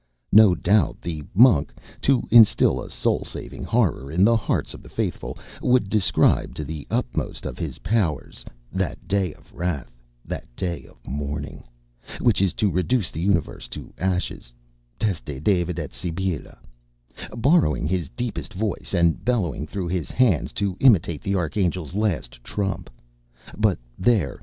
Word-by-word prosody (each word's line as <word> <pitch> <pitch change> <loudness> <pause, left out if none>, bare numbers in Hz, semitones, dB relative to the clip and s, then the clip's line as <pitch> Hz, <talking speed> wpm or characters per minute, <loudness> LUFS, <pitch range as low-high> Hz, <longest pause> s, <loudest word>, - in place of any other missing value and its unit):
No 105 -3 +7
doubt 100 -2 +2
the 80 -3 -5
Monk, 100 - +6 0.3
to 135 -2 +3
instil 115 -3 +6
a - - -8
soul - - 0
saving - - -8
horror 70 +2 +1
in 90 +4 +3
the 115 +2 +5
hearts 110 - -1
of - - -10
the - - -14
faithful, - - -3 0.2
would 125 -6 +2
describe 105 -4 +2
to 75 - -4
the 75 0 -6
utmost 60 - -2
of - - -5
his - - -4
powers 100 -9 -1 0.3
"that - - -3
day 95 -3 +1
of - - -22
wrath, 85 -7 -3 0.3
that - - -5
day 85 +2 -3
of - - -20
mourning," 70 +1 -5 0.6
which 115 -6 +3
is 95 -3 +1
to 105 -3 +1
reduce 90 +3 0
the 80 - -5
universe 90 -9 0
to - - -9
ashes, 90 -9 -2 0.5
teste 75 - -3
David 90 -3 +1
et 75 -4 -5
Sibylla, 90 -1 -4 0.8
borrowing 125 - +3
his 85 -4 -1
deepest 120 -6 -5
voice 105 0 -2
and 85 -2 +2
bellowing 90 - 0
through 95 +2 -4
his 90 -3 -2
hands 115 - +2
to 100 -3 -1
imitate 90 - +4
the 100 - -1
Archangel's 90 -2 -1
last 90 - -2
trump. 95 +8 -3 0.7
But 105 -3 +2 0.2
there! 100 - +2
90 Hz, 150 wpm, -24 LUFS, 80-105 Hz, 0.8 s, No